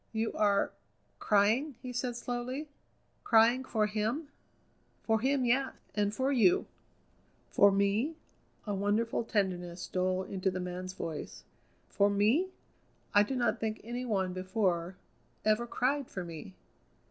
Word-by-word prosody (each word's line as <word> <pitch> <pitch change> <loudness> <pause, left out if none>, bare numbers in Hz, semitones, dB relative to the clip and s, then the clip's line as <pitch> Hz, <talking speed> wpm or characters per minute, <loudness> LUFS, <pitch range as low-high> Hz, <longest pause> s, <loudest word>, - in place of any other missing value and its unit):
"You 220 0 -1
are 200 -1 +2 0.5
crying?" 220 +8 +2
he 250 0 -7
said 245 0 -2
slowly; 250 +4 -4 0.6
"crying 235 +3 +5
for 220 -4 +1
him?" 220 +8 -2 0.7
"For 220 -1 +2
him, 265 0 +2
yes, 265 +3 +1 0.2
and 205 -1 +1
for 260 +6 0
you!" 220 -10 +4 0.9
"For 200 0 +6
me?" 200 +10 +1 0.5
a 205 - -2
wonderful 205 +4 0
tenderness 180 -5 -2
stole 185 0 0
into 190 0 -1
the 185 0 -3
man's 180 +1 -5
voice 160 -5 -6 0.4
"for 200 0 +2
me? 215 - +3 0.7
I 205 - +7
do 235 +6 -1
not 240 -3 +1
think 220 -1 -2
any 240 +3 -4
one 190 -6 0
before 185 -2 -1 0.5
ever 215 +2 +2
cried 265 +3 0
for 185 - -5
me. 160 - -9
215 Hz, 135 wpm, -31 LUFS, 190-245 Hz, 0.9 s, I